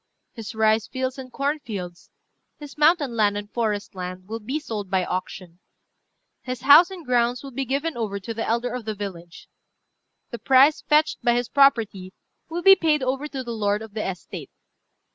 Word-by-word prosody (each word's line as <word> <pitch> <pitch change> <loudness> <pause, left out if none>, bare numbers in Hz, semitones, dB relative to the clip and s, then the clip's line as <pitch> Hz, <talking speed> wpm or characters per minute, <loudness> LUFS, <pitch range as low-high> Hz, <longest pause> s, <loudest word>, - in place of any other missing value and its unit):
"His 225 -1 -8
rice 220 0 +2
fields 260 0 -4
and 255 -1 -9
corn 285 +4 -1
fields, 185 -9 -8 0.5
his 290 -2 -11
mountain 300 -4 +3
land 205 -2 +2
and 205 0 -7
forest 215 -4 -2
land, 185 0 -7
will 225 +1 -5
be 260 +8 -3
sold 215 -9 -6
by 185 -1 +1
auction. 180 -1 -6 0.8
His 255 -2 -6
house 290 +7 +8
and 365 -4 -10
grounds 245 0 +1
will 275 - -8
be 270 +2 -3
given 280 +5 -2
over 210 -4 -3
to 215 +4 -6
the 225 0 -4
elder 235 +2 -1
of 250 -3 -5
the 215 -1 -3
village. 175 -4 -8 0.8
The 235 - -6
price 270 +3 +5
fetched 305 +1 +2
by 240 - +3
his 245 -1 -1
property 225 -9 +2 0.4
will 340 +1 -4
be 390 0 +9
paid 310 -6 +1
over 265 +3 -2
to 270 -3 -6
the 240 -1 -5
lord 210 -1 -1
of 220 -2 -12
the 215 - -3
estate. 180 -2 -8
235 Hz, 185 wpm, -24 LUFS, 205-275 Hz, 0.8 s, be